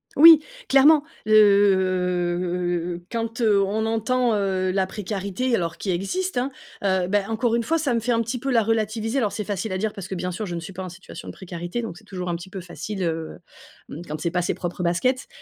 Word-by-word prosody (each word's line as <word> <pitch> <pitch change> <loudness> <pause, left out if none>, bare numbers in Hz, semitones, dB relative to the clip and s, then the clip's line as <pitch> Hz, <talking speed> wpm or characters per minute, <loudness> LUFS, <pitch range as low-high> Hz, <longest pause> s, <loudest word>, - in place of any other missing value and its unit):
Oui, 320 +1 +10 0.3
clairement. 285 +3 +6 0.2
Le 180 -4 +2
quand, 230 0 -3
heu, 210 -3 +4
on 210 +3 -1
entend, 230 +2 +1
heu, 190 -2 0
la 190 0 +1
précarité, 200 +4 -3
alors 170 -5 -2
qui 195 - -2
existe, 305 - -2
hein, 255 +2 -1 0.3
heu, 190 -2 +1
ben, 205 +1 0
encore 225 +1 0
une 235 - +1
fois, 330 +8 +1
ça 295 -6 0
me 230 - +2
fait 235 +2 -1
un 230 -1 +2
petit 230 +2 -3
peu 270 +3 -3
la 230 -3 +4
relativiser. 225 +3 0
Alors 215 -5 0
c'est 210 +2 -3
facile 205 +1 -3
à 185 - -1
dire 210 +2 -2
parce 195 -2 -7
que 190 - -4
bien 180 0 -3
sûr, 205 +4 -4
je 175 - -4
ne - - -3
suis 170 +3 -8
pas 190 +1 -6
en 185 - -6
situation 180 +2 -11
de - - -6
précarité, 175 +4 -5
donc 220 - -5
c'est 215 - -17
toujours 180 -3 -5
un 170 - -1
petit 175 +2 -8
peu 195 0 -6
facile, 180 +3 -6
heu, 165 -1 -3 0.5
mmh, 160 - -7
quand 155 +1 -5
c'est 170 +2 -1
pas 180 0 0
ses 175 - -1
propres 175 0 -5
baskets. 250 +10 0
200 Hz, 230 wpm, -24 LUFS, 180-225 Hz, 0.5 s, Oui